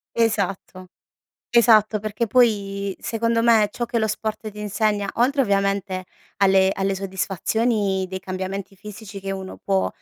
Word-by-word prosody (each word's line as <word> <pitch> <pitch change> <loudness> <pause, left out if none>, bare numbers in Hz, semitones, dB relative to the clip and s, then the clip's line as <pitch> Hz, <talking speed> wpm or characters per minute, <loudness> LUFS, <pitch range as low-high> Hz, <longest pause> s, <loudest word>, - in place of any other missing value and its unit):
Esatto. 200 -4 -1 0.7
Esatto 220 -2 +5
perché 215 +3 -2
poi 200 -5 +1
secondo 230 0 0
me 225 -3 +5
ciò 240 - -3
che 235 0 -1
lo 220 - +1
sport 215 0 -4
ti 210 0 -11
insegna, 210 0 0
oltre 270 +4 +3
ovviamente 195 -2 0 0.3
alle 190 -1 +4
alle 195 0 -1
soddisfazioni 195 +1 -1
dei 190 0 -4
cambiamenti 190 +1 -5
fisici 210 0 -10
che 195 0 -6
uno 190 -1 -6
può, 195 -1 +1
205 Hz, 140 wpm, -22 LUFS, 195-220 Hz, 0.7 s, Esatto